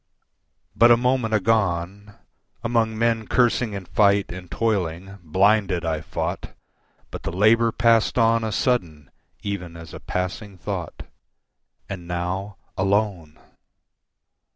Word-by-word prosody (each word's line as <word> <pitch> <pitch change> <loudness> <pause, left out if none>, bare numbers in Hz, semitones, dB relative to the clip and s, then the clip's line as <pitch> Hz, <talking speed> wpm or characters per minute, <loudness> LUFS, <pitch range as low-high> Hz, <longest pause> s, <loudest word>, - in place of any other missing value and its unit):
But 120 - +6
a 120 - +7
moment 125 -2 +1
agone, 100 -2 0 0.5
Among 115 -2 0
men 115 -1 0
cursing 120 -2 +2
in 100 -2 -6
fight 100 +1 +2
and 90 -1 -8
toiling, 95 -2 -2
blinded 95 +1 +2
I 80 -2 -1
fought, 80 - -4 0.6
But - - -7
the - - -4
labour 110 +5 +4
passed 115 0 +2
on 115 -1 +3
a 110 - -2
sudden 85 - -1 0.3
even 90 -5 -5
as 80 -1 -11
a - - -7
passing 95 +2 -4
thought, 90 -3 -5 0.8
And 90 -3 -7
now 90 +3 -3 0.2
alone! 95 -5 -1
100 Hz, 120 wpm, -23 LUFS, 90-115 Hz, 0.8 s, a